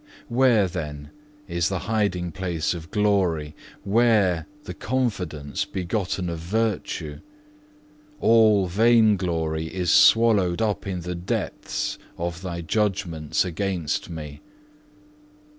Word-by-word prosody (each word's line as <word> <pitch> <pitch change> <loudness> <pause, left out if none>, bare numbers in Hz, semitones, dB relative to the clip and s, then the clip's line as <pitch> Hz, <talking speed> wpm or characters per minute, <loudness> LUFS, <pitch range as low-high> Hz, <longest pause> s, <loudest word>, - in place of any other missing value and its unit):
Where, 120 -5 +4
then, 75 -5 -6 0.4
is 85 -2 0
the 95 - -1
hiding 100 -5 0
place 85 -1 -2
of 80 -2 -8
glory, 95 -8 +1 0.3
where 100 -5 +2 0.2
the - - -7
confidence 95 - -2
begotten 95 0 -3
of 85 -1 -4
virtue? 90 -5 -2 1.0
All 110 -5 +5
vain 110 +3 +4
glory 80 -4 -2
is 90 -3 0
swallowed 105 -6 +5
up 105 -3 -1
in 90 -2 -3
the 90 +1 -4
depths 85 +1 -3 0.2
of 85 0 -4
Thy 85 -2 -4
judgments 90 -4 -1
against 90 -3 -2
me. 75 -3 -8
90 Hz, 110 wpm, -24 LUFS, 85-105 Hz, 1.0 s, All